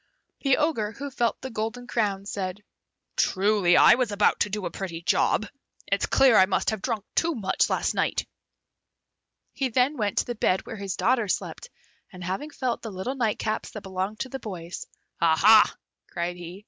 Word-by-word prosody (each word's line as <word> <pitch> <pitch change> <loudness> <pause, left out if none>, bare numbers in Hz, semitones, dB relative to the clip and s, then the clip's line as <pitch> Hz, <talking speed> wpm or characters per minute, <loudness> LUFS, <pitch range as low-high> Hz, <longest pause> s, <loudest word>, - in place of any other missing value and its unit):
The 275 -2 +2
Ogre, 255 -9 0
who 280 +4 -6
felt 240 -3 0
the 265 - -6
golden 225 +3 -4
crowns, 200 -4 -1
said, 195 +1 -4 0.5
"Truly, 195 -2 +3
I - - +8
was 245 -3 0
about 205 0 +2
to 205 - +1
do 205 -1 -3
a - - -3
pretty 170 -2 -6
job! 215 - +2 0.4
It's 200 0 0
clear 265 -4 +5
I 190 - +6
must 195 - 0
have 215 -3 -4
drunk 220 -4 -2
too 335 -1 +1
much 205 -6 +1
last - - 0
night." - - 0 1.3
He 265 -2 -1
then 255 +5 +1
went 210 -3 -1
to - - +2
the 240 - -3
bed 190 -4 0
where 220 - -7
his 195 -2 -4
daughters 235 -5 +2
slept, - - -9 0.4
and 180 -2 -10
having 190 - -3
felt 255 -5 -3
the 225 - -6
little 190 +7 -4
nightcaps 220 -4 -1
that 215 - -6
belonged 190 +2 -4
to 260 - -3
the 270 - -5
boys. 180 -7 -7 0.3
"Aha!" 170 +7 +6 0.4
cried 175 +1 -3
he. 175 +2 -9
210 Hz, 185 wpm, -26 LUFS, 190-245 Hz, 1.3 s, I